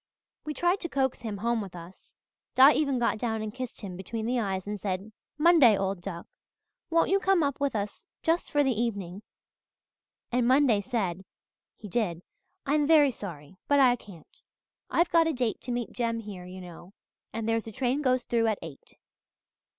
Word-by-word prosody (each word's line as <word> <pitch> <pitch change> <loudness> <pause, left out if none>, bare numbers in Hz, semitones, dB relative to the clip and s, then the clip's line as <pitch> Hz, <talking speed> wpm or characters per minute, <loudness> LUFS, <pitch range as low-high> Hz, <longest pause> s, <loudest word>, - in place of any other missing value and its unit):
"We 305 -1 -4
tried 350 +6 +1
to 340 - -4
coax 265 -2 0
him 215 -3 -4
home 230 +2 0
with 190 -3 -8
us 175 +2 -13 0.4
Di 265 +3 +9
even 280 -4 +1
got 235 -2 0
down 220 -2 -2
and 215 -1 -5
kissed 255 -1 -6
him 190 -3 -6
between 220 +4 -5
the 245 +1 0
eyes 190 -4 -2
and 205 0 -4
said, 195 +2 -3 0.3
'Monday, 300 - +6
old 195 -1 -2
duck, 170 -2 -6 0.6
won't 330 0 +3
you 395 - +4
come 385 -3 +3
up 280 -1 -1
with 280 -4 0
us 205 -1 -4 0.2
just 330 +2 +1
for 290 0 +3
the 270 - +2
evening?' 200 -5 -3 1.1
And 245 0 +2
Monday 255 -5 +4
said 195 -6 -2 0.5
he 210 - -9
did! 180 -5 -1 0.4
'I 280 - 0
am 300 -1 +2
very 300 -4 +6
sorry 175 - -9
but 285 0 +4
I 250 -3 +6
can't. 190 -9 -16 0.5
I've 340 0 +2
got 335 -1 +5
a 325 - 0
date 245 -4 -1
to 250 - -5
meet 240 -1 -3
Jem 230 -2 -1
here, 200 -4 -8
you 185 +1 -9
know, 175 +2 -12 0.4
and 225 0 -4
there's 225 0 0
a - - -6
train 260 +4 0
goes 255 -3 +2
through 230 -1 +1
at 215 -2 +1
eight.' 155 -4 -11
230 Hz, 190 wpm, -28 LUFS, 195-270 Hz, 1.1 s, Di